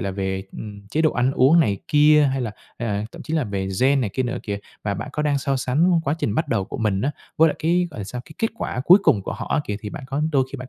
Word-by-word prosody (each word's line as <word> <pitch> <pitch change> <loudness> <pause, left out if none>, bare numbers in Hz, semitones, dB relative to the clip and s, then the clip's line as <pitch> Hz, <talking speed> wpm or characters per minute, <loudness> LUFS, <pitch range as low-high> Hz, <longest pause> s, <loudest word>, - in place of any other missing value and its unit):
là 100 - -2
về, 95 0 -3
ừm, 100 -2 -9
chế 155 +8 0
độ 155 - +4
ăn 125 +2 +1
uống 140 +6 +5
này 100 -9 +1
kia, 150 0 +6
hay 135 - -1
là, 120 -3 -2 0.3
à, 105 -3 -2
thậm - - -9
chí 160 - -4
là 155 -4 +1
về 100 -3 -3
gen 135 +1 +4
này 110 -6 -1
kia 130 - 0
nữa 120 -1 -2
kìa. 100 -1 -3 0.2
Và 100 -1 -1
bạn 100 - -5
có 150 - -1
đang 145 -2 +1
so 135 0 -1
sánh 165 +8 +2
quá 140 - +1
trình 105 - -1
bắt - - 0
đầu 95 - 0
của 135 - -7
mình 105 -4 0
á, 140 +6 0 0.3
với 160 +1 +6
lại - - -3
cái, 175 +3 +2
gọi 125 - -8
là 100 - -4
sao? 125 +5 -6
Cái - - -13
kết 225 - +1
quả 125 - -3
cuối 180 +6 +8
cùng 100 - +3
của - - -4
họ - - -6
á - - +2
kìa, 105 - -3
thì 105 - -6
bạn - - -7
có 140 +3 -2
đôi 135 -2 +3
khi 140 - -4
bạn 130 0 -8
130 Hz, 310 wpm, -22 LUFS, 105-150 Hz, 0.3 s, cuối